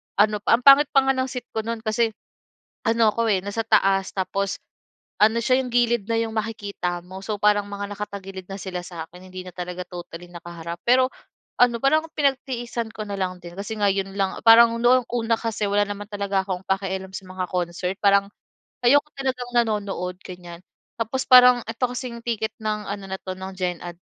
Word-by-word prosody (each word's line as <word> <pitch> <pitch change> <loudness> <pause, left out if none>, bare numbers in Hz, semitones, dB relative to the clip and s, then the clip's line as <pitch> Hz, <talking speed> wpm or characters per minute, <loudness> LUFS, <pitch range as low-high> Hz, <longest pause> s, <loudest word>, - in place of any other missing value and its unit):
ano, 210 +1 +3
ang 235 +2 +4
pangit 275 +2 +8
pa 270 - +6
nga 270 - +3
ng 260 0 -1
seat 250 -1 -7
ko 220 - -2
no'n, 230 -1 -3
kasi 220 0 0 0.7
ano 225 -1 +4
ako, 230 0 0
eh, 190 - +3
nasa 205 +3 -2
taas 195 -3 +3
tapos 195 +1 -1 0.7
ano 220 +2 +5
siya 255 +2 +3
yung 250 - -5
gilid 240 -3 +2
na 230 - 0
yung 225 -1 -2
makikita 205 -5 -3
mo. 185 +1 -9
So, 215 - -2
parang 205 -1 +3
mga 205 0 -6
nakatagilid 195 -2 -7
na - - -4
sila 180 -2 -5
sa 170 -2 -7
akin 180 +2 -14
hindi 185 - -6
na 180 - -8
talaga 180 0 -5
totally 175 -1 -9
nakaharap 170 -1 -8
pero, 255 +1 +5 0.5
ano 245 -1 +5
parang 310 +4 +3
pinagtiisan 255 -5 -1
ko 215 - -4
na 200 - -4
lang 185 -1 -2
din 175 0 -9
kasi 200 +3 -5
ngayon 195 -1 0
lang, 195 -1 0
parang 230 0 +8
noong 245 +1 +4
una 230 -1 +1
kasi 220 -3 -2
wala 205 +1 +3
naman 205 0 -6
talaga 200 -1 -1
akong 185 -1 -3
pakialam 190 -1 -2
sa 190 - -7
mga 185 0 -3
concert, 180 +1 -2
parang 200 0 +5 0.6
ayoko 285 +5 +5
talagang 255 -2 -3
nanonood 205 -6 0
ganyan. 175 -1 -10 0.4
Tapos, 235 +4 -1
parang 250 -1 +8
ito 225 +3 -5
kasing 245 -1 -5
ticket 225 -2 -1
ng 215 -1 -2
ano 200 -1 -5
na 190 - -2
'to 185 - -5
ng 190 0 -7
gen 180 -2 -2
ad 175 -1 -7
205 Hz, 190 wpm, -23 LUFS, 190-235 Hz, 0.7 s, pangit